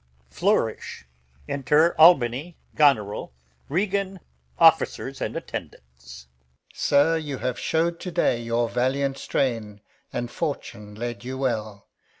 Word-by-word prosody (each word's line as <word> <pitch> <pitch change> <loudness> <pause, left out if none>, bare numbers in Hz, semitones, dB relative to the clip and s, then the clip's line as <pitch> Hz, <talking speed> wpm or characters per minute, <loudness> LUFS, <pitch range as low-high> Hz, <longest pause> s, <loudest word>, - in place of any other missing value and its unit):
Flourish. - - -1 0.4
Enter 150 +4 +2
Albany, 155 0 +5 0.2
Goneril, 110 - +2 0.4
Regan, 195 +3 -1 0.4
Soldiers. - - +3
Alb. - - -5 1.0
Sir, 145 +3 +3
you 145 -4 -4
have 125 0 -3
show'd 170 +1 0
to 180 - -5
day 120 -7 +1
your 115 0 0
valiant 135 +3 -1
strain, 115 -6 -2 0.3
And 120 0 -4
fortune 105 -9 -5
led 120 +1 -5
you 130 +1 -5
well. 110 -6 -3
130 Hz, 105 wpm, -24 LUFS, 115-160 Hz, 1.0 s, Albany